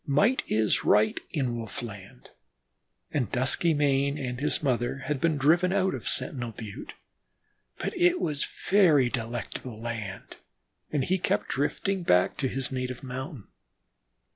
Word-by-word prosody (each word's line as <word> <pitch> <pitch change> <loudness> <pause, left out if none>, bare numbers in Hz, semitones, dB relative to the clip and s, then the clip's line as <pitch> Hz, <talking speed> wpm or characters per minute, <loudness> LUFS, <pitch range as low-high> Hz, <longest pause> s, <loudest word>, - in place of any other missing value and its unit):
Might 200 - +3
is 110 -1 +1
right 105 +1 +3
in 130 -5 -1
wolf 115 +1 -6
land, 100 - -10 0.8
and 125 -8 -1
Duskymane 140 +1 +2
and 125 -3 -4
his 150 +2 0
mother 130 0 0
had 145 -3 -2
been 160 -3 +2
driven 170 +6 +3
out 190 -1 +2
of - - -3
Sentinel 120 -5 +2
Butte. 110 +2 -8 0.8
But - - -3
it 355 0 +3
was 145 -3 -1
a - - -8
very 160 -11 +5
delectable 120 0 -5
land 110 -4 -6 0.5
and 145 -3 +1
he 185 +1 +1
kept 180 - 0
drifting 185 +7 -1
back 90 - +3
to 135 - 0
his 135 +1 -2
native 125 -1 -4
mountain. 130 -2 -7
135 Hz, 140 wpm, -27 LUFS, 120-150 Hz, 0.8 s, very